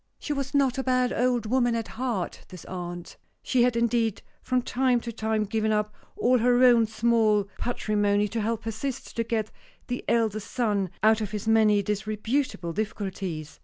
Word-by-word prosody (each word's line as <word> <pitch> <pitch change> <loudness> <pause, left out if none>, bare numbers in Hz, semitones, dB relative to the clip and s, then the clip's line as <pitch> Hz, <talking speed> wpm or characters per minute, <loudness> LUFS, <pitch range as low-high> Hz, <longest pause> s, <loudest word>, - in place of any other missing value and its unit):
She 295 - -3
was 275 0 -3
not 270 -2 +2
a - - -1
bad 255 -1 +1
old 245 -2 +1
woman 240 +1 +2
at 230 -1 -3
heart, 230 -6 -3
this 180 -2 -11
aunt. 175 -1 -7 0.3
She 255 - +2
had 245 0 +3
indeed 235 -2 +1 0.2
from 255 -1 0
time 250 -1 +1
to 235 - -5
time 220 -1 -1
given 215 +1 0
up 210 0 0 0.2
all 250 +1 +3
her 245 +2 +4
own 240 -3 +6
small 220 -1 +2 0.2
patrimony 205 -3 +1
to 225 +2 -2
help 225 +1 -2
her 225 - -3
sister 265 +4 -5
to 230 - -1
get 220 -2 -2 0.4
the 245 - -3
eldest 220 -3 0
son 205 -6 0
out 220 0 +5
of 210 - -2
his 210 +1 -5
many 215 -2 +4
disreputable 210 -1 -2
difficulties. 190 -6 -4
225 Hz, 175 wpm, -26 LUFS, 210-245 Hz, 0.4 s, own